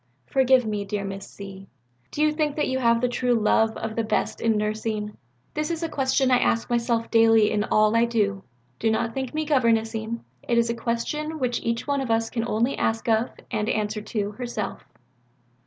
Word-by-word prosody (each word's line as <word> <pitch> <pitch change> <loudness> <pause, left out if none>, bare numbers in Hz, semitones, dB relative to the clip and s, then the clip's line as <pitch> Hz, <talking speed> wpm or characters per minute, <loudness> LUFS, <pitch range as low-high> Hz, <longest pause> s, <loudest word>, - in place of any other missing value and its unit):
Forgive 260 - +3
me, 210 -1 -2
dear 200 0 -3
Miss 195 0 -7
Z., 195 -1 -10 0.4
do 300 - -1
you 305 - +4
think 300 -2 0
that 300 - 0
you 260 0 -1
have 235 -2 +3
the 250 - +2
true 245 0 +1
love 220 0 +2
of 220 0 -4
the 230 - 0
best 220 - -1
in 225 -2 +2
nursing? 210 0 -2 0.4
This 305 +1 -2
is 335 0 -3
a 330 - -1
question 265 -2 +1
I 250 - +5
ask 230 +2 0
myself 235 -1 0
daily 225 -2 +5
in 210 0 0
all 215 +1 +3
I 230 +1 +5
do. 205 -4 0 0.4
Do 225 - +1
not 225 +1 0
think 265 +1 -4
me 310 0 0
governess 230 -6 +2
ing. 225 +1 -4 0.2
It 235 - 0
is 235 0 +3
a - - -3
question 300 +7 -2
which 250 -4 -1
each 230 0 -2
one 280 -1 0
of 260 - -4
us 225 0 +1
can 230 -1 -2
only 235 +4 +1
ask 225 +3 -1
of, 225 +1 +2 0.2
and 215 -1 -1
answer 210 0 -1
to, 210 -1 -3
herself." 220 -3 -5
230 Hz, 205 wpm, -25 LUFS, 215-255 Hz, 0.4 s, I